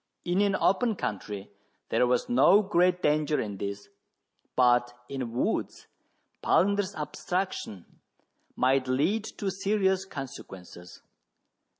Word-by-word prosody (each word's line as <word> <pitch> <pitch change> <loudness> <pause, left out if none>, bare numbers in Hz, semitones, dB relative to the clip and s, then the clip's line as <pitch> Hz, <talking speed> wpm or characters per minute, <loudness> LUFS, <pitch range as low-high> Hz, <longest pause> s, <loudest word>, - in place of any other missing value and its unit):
In 180 +3 +1
an 200 -1 +2
open 220 +5 +2
country 100 - -5 0.4
there 120 +2 +2
was 125 0 +1
no 170 - +5
great 180 -1 +2
danger 150 0 +2
in 100 -2 -4
this, 100 +1 -5 0.7
but 120 -1 +3
in 130 -4 -4
woods 120 - -2 0.6
Palander's 200 +1 +2
abstraction 155 - -4 0.7
might 130 +1 +2
lead 160 +13 +1
to 195 -2 -2
serious 190 0 0
consequences. 95 - -10
150 Hz, 105 wpm, -28 LUFS, 120-190 Hz, 0.7 s, no